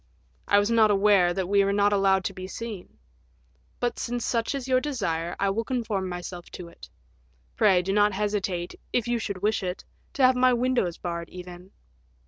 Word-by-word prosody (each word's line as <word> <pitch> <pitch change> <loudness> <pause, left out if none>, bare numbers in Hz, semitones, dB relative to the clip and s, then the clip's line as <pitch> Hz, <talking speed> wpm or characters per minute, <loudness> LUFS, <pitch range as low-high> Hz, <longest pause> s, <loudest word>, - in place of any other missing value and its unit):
I 205 - +4
was 205 +2 +2
not 225 -2 +5
aware 200 -3 +4
that 185 0 -2
we 200 +1 +3
were 195 - +1
not 205 0 +3
allowed 195 -1 +3
to - - -3
be 185 0 -7
seen; 205 - -8 0.8
but, 240 -1 -2
since 240 0 -3
such 230 +3 -1
is 270 -2 -5
your 255 -1 +3
desire, 175 - -2
I 200 0 +1
will 225 +4 -1
conform 225 -7 -2
myself 175 0 -7
to 175 -2 -8
it; - - -14 0.7
pray 180 - +4
do 195 +2 -1
not 205 0 +3
hesitate, 195 -3 -2 0.2
if 240 -1 0
you 240 -1 0
should 200 -3 -5
wish 215 +1 +1
it, 180 -1 -5 0.3
to 280 -6 0
have 255 0 +6
my 255 0 +4
windows 245 -8 0
barred, 170 -1 -5
even." 180 0 -10
200 Hz, 190 wpm, -26 LUFS, 180-230 Hz, 0.8 s, have